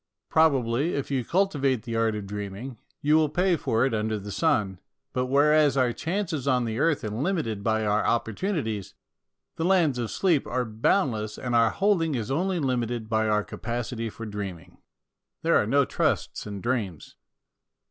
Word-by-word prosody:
Probably, 140 -2 +2
if 140 0 -3
you 130 -3 0
cultivate 140 - +1
the 115 -1 -4
art 115 -1 +1
of 105 -1 -5
dreaming, 105 +4 -6 0.2
you 150 +1 +4
will 155 -2 +3
pay 180 +4 +2
for 115 -5 +1
it 135 - -1
under 110 0 -1
the 100 0 -7
sun, 100 - +1 0.3
but 125 -1 0
whereas 145 +1 +4
our 125 -2 +2
chances 165 - -3
on 125 -3 +2
the 115 +1 -3
earth 160 -1 +2
are 105 - -3
limited 115 - -2
by 110 0 +1
our 105 +1 +2
opportunities, 115 - -2 0.6
the 165 - -1
lands 170 -8 +3
of 115 -2 -2
sleep 170 -7 +1
are 125 0 -1
boundless 110 - 0
and 125 -2 -4
our 115 -1 +5
holding 165 - +1
is 120 +1 -3
only 180 +6 0
limited 120 -6 -1
by 110 -1 +1
our 105 0 +2
capacity 115 0 -4
for 115 +2 -8
dreaming. 100 -6 -7 0.6
There - - +3
are - - +1
no - - +3
trusts - - -1
in 100 -2 -6
dreams. 110 - -3
120 Hz, 170 wpm, -26 LUFS, 110-150 Hz, 0.6 s, our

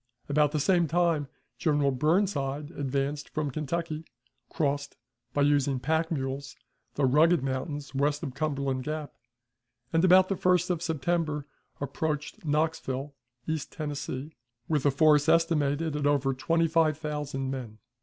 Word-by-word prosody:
About 150 0 +3
the 155 - 0
same 175 +2 +3
time 165 -3 +1 0.3
General 145 -3 +2
Burnside 150 -1 0
advanced 140 0 -2
from 150 -2 -2
Kentucky, 155 +2 -3 0.5
crossed, 145 -2 -1 0.3
by 145 +2 +1
using 140 -2 +2
pack 160 +5 0
mules, 135 -2 -3 0.4
the 140 - +2
rugged 155 +3 +4
mountains 140 +2 -3
west 145 +3 0
of 135 -5 -4
Cumberland 140 -2 -1
Gap, 155 +1 -4 0.8
and, 165 +1 +3
about 185 0 +7
the 195 - 0
1st 180 0 +2
of 170 -2 -1
September, 160 -2 -1 0.3
approached 150 +1 -3
Knoxville, 150 -3 -1 0.3
East 160 -2 -3
Tennessee, 145 -1 -5 0.4
with 150 -3 +1
a - - +4
force 150 +1 +4
estimated 160 -2 +2
at 145 -1 0
over 140 -2 +2
twenty 165 +6 +1
five 160 -2 +2
thousand 145 -4 -3
men. 120 -5 -6
150 Hz, 135 wpm, -28 LUFS, 140-160 Hz, 0.8 s, about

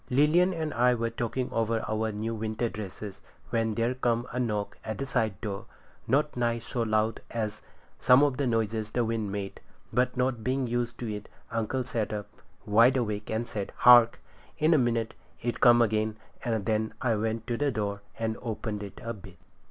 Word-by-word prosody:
Lilian 150 +8 +4
and 160 -4 -3
I 125 +1 +4
were 115 0 -1
talking 125 +2 -2
over 115 -1 0
our 110 0 0
new 110 +2 -3
winter 110 +1 -2
dresses, 105 -1 -7 0.3
when 115 -2 +1
there 115 +3 +1
come 120 -2 0
a 125 - -1
knock 105 -4 -2
at 110 - -4
the 135 - -3
side 110 -6 0
door, 100 -3 -4 0.4
not 145 +5 +2
nigh 120 -1 +1
so 120 +1 -4
loud 110 0 +1
as 110 -3 -3 0.4
some 125 +3 +6
of 140 -3 +2
the 140 -2 0
noises 110 -2 0
the 120 +2 0
wind 110 -3 -2
made, 100 -1 -5 0.3
but 125 +1 +1
not 125 -3 0
being 130 +2 0
used 120 0 -2
to 115 -3 -2
it, 105 0 -7 0.2
uncle 115 +3 -1
sat 115 -4 -2
up, 105 -1 -3 0.4
wide 115 +5 +5
awake, 105 -4 -2
and 110 +2 -1
said, 100 -2 -4
'Hark!' 120 -1 +7 0.4
In 155 +2 +4
a 155 - +5
minute 115 -2 0 0.3
it 120 0 -3
come 120 -1 +7
again, 110 0 0 0.3
and 110 -4 -1
then 110 0 0
I 120 -3 +1
went 110 +1 -1
to 120 - -1
the 145 +2 +1
door 100 -3 -2 0.2
and 110 -1 -2
opened 110 -2 -4
it 100 -1 -8
a 115 0 -3
bit. 95 -4 -13
115 Hz, 190 wpm, -28 LUFS, 110-125 Hz, 0.4 s, Hark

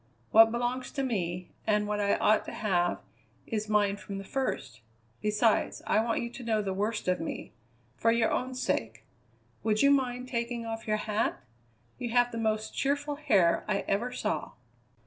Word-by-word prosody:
What 225 0 +8
belongs 245 +2 -2
to 275 - -1
me, 180 -7 -2 0.2
and 210 -1 +3
what 210 0 -1
I 200 -1 +2
ought 215 +1 +3
to - - -6
have, 175 -4 0 0.4
is 215 -2 -3
mine 205 -1 +2
from 200 -1 -7
the 195 - -5
first. 135 - -3 0.4
Besides, 215 +1 +1
I - - +3
want 230 0 0
you 235 - -5
to 250 - -9
know 220 -2 +1
the 190 -1 -2
worst 210 +2 -2
of 180 0 +2
me 165 - -5 0.4
for 230 - +3
your 230 -1 +2
own 255 0 -1
sake. 110 - -2 0.6
Would 215 +1 +2
you 280 - +6
mind 250 -2 +1
taking 235 -1 -2
off 225 0 -5
your 215 0 +2
hat? 215 +1 -1 0.6
You 245 -2 -3
have 245 0 +4
the 230 - -4
most 220 -1 -1
cheerful 290 +1 0
hair 200 - +3
I 205 -2 +1
ever 230 +6 0
saw." - - -2
220 Hz, 180 wpm, -29 LUFS, 205-245 Hz, 0.6 s, What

